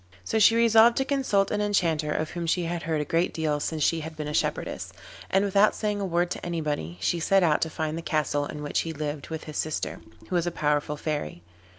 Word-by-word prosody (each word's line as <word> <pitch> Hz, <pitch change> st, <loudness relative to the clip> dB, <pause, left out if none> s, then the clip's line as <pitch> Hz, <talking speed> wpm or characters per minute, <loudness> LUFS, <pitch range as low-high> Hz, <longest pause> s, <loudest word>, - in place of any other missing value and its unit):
So 220 Hz, -, 0 dB
she 220 Hz, +2 st, +6 dB
resolved 230 Hz, 0 st, +6 dB
to 270 Hz, -, +1 dB
consult 260 Hz, -9 st, +1 dB
an 210 Hz, -, 0 dB
Enchanter 165 Hz, -7 st, +1 dB
of 155 Hz, +1 st, -2 dB
whom 170 Hz, -1 st, -4 dB
she 175 Hz, +2 st, +1 dB
had 170 Hz, 0 st, -3 dB
heard 160 Hz, -1 st, -1 dB
a -, -, -3 dB
great 165 Hz, +4 st, 0 dB
deal 155 Hz, -2 st, 0 dB
since 155 Hz, +1 st, -2 dB
she 165 Hz, -, +2 dB
had 160 Hz, 0 st, -7 dB
been 150 Hz, -1 st, -4 dB
a 150 Hz, -, -4 dB
shepherdess, -, -, -2 dB, 0.4 s
and 195 Hz, +1 st, +3 dB
without 200 Hz, +1 st, +4 dB
saying 210 Hz, -1 st, -2 dB
a -, -, -1 dB
word 175 Hz, 0 st, 0 dB
to -, -, -5 dB
anybody 150 Hz, -, -3 dB
she 170 Hz, -, 0 dB
set 195 Hz, +3 st, +3 dB
out 155 Hz, -3 st, +3 dB
to 160 Hz, -, 0 dB
find 155 Hz, -1 st, -3 dB
the -, -, -5 dB
castle 145 Hz, -2 st, 0 dB
in 150 Hz, -1 st, -7 dB
which 145 Hz, -, -1 dB
he 165 Hz, -, -3 dB
lived 150 Hz, -1 st, -5 dB
with 160 Hz, -1 st, -5 dB
his 155 Hz, -1 st, -7 dB
sister, 155 Hz, -1 st, -2 dB, 0.3 s
who -, -, -5 dB
was 175 Hz, 0 st, +1 dB
a -, -, 0 dB
powerful 150 Hz, -1 st, 0 dB
Fairy. 145 Hz, -, -4 dB
165 Hz, 240 wpm, -26 LUFS, 150-195 Hz, 0.4 s, she